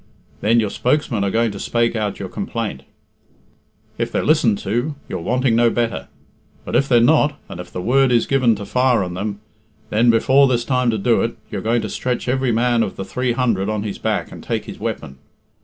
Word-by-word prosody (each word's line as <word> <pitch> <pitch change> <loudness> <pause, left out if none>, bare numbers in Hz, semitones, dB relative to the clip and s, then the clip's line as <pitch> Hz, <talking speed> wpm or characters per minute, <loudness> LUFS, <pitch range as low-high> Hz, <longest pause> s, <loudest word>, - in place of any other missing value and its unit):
Then 115 +3 +3
your 105 -3 0
spokesmen 125 -5 0
are 100 - +1
going 115 +2 +1
to 100 - -8
spake 120 +2 0
out 105 -3 -2
your - - -5
complaint. - - -4 1.2
If - - -1
they're - - -1
listened 125 -9 +3
to, 120 +9 -1
you're 95 - -4
wanting 125 +4 +1
no 120 0 +4
better. 115 0 -2 0.6
But - - -3
if 140 - +2
they're 120 -2 +5
not, 145 +3 +3
and - - -9
if - - -11
the 90 - -5
word 135 +3 +3
is 120 -2 +3
given 130 -5 +2
to 100 0 -7
fire 125 -1 +2
on 90 -1 -5
them, 100 +2 -4 0.5
then, 115 +3 +3
before 130 +5 +5
there's 120 -2 0
time 125 -2 +1
to 110 - 0
do 115 +3 +2
it, 115 - -2
you're 100 -3 -3
going 115 +2 0
to - - -2
stretch 125 +4 -3
every 130 0 +1
man 120 +1 +2
of 95 - -2
the 95 - -5
three 125 +4 -1
hundred 115 -6 0
on 105 -1 -2
his 105 -2 -5
back - - -2
and - - -10
take - - -3
his - - -9
weapon. 65 0 -5
115 Hz, 215 wpm, -20 LUFS, 105-125 Hz, 1.2 s, they're